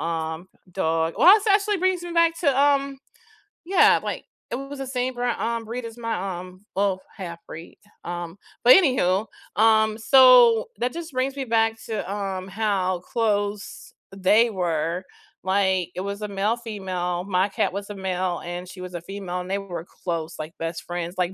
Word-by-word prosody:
um, 160 +2 -3 0.2
dog 165 -2 0
Well, 365 - +8
this 430 0 0
actually 410 0 +3
brings 370 -1 0
me 345 -1 -6
back 335 -1 +3
to, 280 -5 +2
um 280 -1 +2 0.7
Yeah, 380 +2 +5
like, - - -4 0.3
it - - -1
was 275 +1 -8
the 270 - -3
same 255 0 -2
bra 245 -1 -1
um, 230 0 -1
breed 235 +2 -5
as 230 0 -9
my, 195 -6 -3
um 185 +2 -12
Well, 195 -1 +1 0.2
half-breed, 170 -3 -9 0.3
um, 175 0 -5 0.3
but 250 - +9
anyhoo, 220 - +3 0.3
um, 220 0 +4
so 245 -2 +7
that 245 +1 -1
just 335 -1 -7
brings 265 +2 -1
me 275 - -3
back 225 -1 +2
to, 215 -4 -4
um, 195 -2 -4
how 195 -3 0
close 205 -1 -2 0.2
they 210 +5 +4
were, 175 -2 -1 0.4
like, 190 -2 +1
it 185 - -3
was 200 +2 -5
a 210 - -3
male, 200 +3 0
female, 185 -6 -3
my 190 0 +1
cat 195 - 0
was 200 +1 -5
a 205 - -6
male 185 -2 -2
and 175 +1 -6
she 185 0 -10
was 180 0 -8
a 175 - -5
female 190 0 -5
and 180 - -8
they 195 - 0
were 175 -4 -6 0.2
close, 170 -2 -3
like 155 +1 -6
best 165 0 -4
friends, 175 0 -5
like 180 0 0
200 Hz, 180 wpm, -24 LUFS, 180-240 Hz, 0.7 s, but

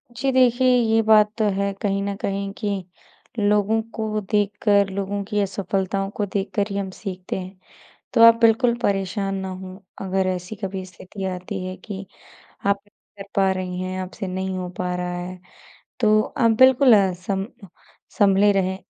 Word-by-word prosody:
जी, 265 +2 0
देखिए 255 0 +4
ये 225 -2 +3
बात 215 -1 +5
तो 220 - +1
है 200 +1 0
कहीं 200 -1 0
न 200 0 -2
कहीं 195 0 -3
कि 200 -3 -2 0.6
लोगों 210 +1 +2
को 215 -1 -2
देखकर, 205 -1 +2
लोगों 200 +1 -3
की 210 +1 -2
असफलताओं 195 0 -2
को 205 - 0
देखकर 200 +1 -2
ही 200 - -3
हम 195 -1 -2
सीखते 185 -1 -6
हैं, 185 +1 -9 0.6
तो 230 - +5
आप 230 0 +9
बिल्कुल 235 +1 +4
परेशान 195 0 -1
ना 190 0 -4
हों। 185 0 -8 0.3
अगर 190 0 0
ऐसी 185 +3 -4
कभी 190 -1 -5
स्थिति 185 +2 -9
आती 185 +1 -5
है 185 0 -5
कि 190 0 -8 0.6
आप 200 0 +2
कर 205 -1 -14
पा 195 -1 +3
रही 185 -1 -3
हैं, 185 0 -4
आपसे 185 +1 -6
नहीं 190 0 -3
हो 180 -1 -4
पा 180 0 -2
रहा 180 0 -3
है, 180 +1 -6 0.6
तो 215 -2 +4
अ, 230 +1 +1
बिल्कुल 260 +2 +6
अ, 195 -2 +3
सम 195 +2 -3 0.7
सँभले 200 0 +5
रहें। 190 -1 0
195 Hz, 170 wpm, -22 LUFS, 185-210 Hz, 0.7 s, आप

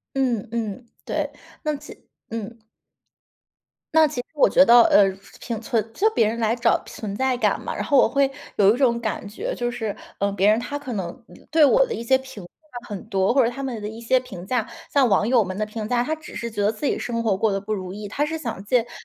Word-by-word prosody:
嗯， 245 -5 0
嗯， 230 +1 -4 0.2
对。 - - -2 0.3
那 305 -1 0
其 295 +2 -11 0.4
嗯。 225 0 -6 1.3
那 320 -1 +6
其 285 -4 -4
实 - - -25
我 290 - +5
觉 275 - +6
得， 240 -3 +8
呃， 205 - +6 0.4
平 230 -3 -4
存 225 -1 -1
就 430 +3 +3
别 230 - +3
人 230 +2 -2
来 225 +1 +1
找 235 -1 +2
存 210 -3 -6
在 260 +2 +1
感 245 - +1
嘛。 - - -4
然 - - -2
后 285 -3 +2
我 - - +6
会 275 +3 +2 0.2
有 205 +1 +5
一 - - -3
种 245 -3 +3
感 220 -2 -3
觉， 205 - -4
就 240 0 -2
是， 225 -4 -4 0.2
嗯， 200 0 0
别 200 +2 +4
人 215 - +4
他 285 +4 -4
可 260 -4 -6
能 185 -4 -3 0.2
嗯， - - -16 0.2
对 315 -1 +6
我 - - +5
的 475 - -4
一 - - -4
些 260 +3 +3
评 265 -6 -10
价 245 - -13
很 205 -4 -6
多， 190 +2 +2
或 265 -1 +5
者 230 - +1
他 275 +2 -7
们 245 -5 -4
的 210 - -4
一 220 +1 -9
些 255 +3 +2
评 190 -8 -9
价 245 -4 0 0.3
像 275 -3 +5
网 200 +1 +3
友 240 -3 +4
们 185 0 -5
的 215 - 0
评 215 0 -5
价， 245 -1 +2
他 310 +5 -1
只 315 -1 -12
是 235 - -4
觉 210 -2 -3
得 205 - +3
自 225 +7 -6
己 - - +1
生 230 -1 -2
活 220 -4 +1
过 210 +2 +1
得 195 - 0
不 210 +2 -4
如 185 -2 -4
意， 205 +1 -7
他 285 +8 -1
是 320 +1 -3
想 235 -10 -5
借 240 +3 +3
评 240 - -12
235 Hz, 270 characters per minute, -23 LUFS, 210-265 Hz, 1.3 s, 得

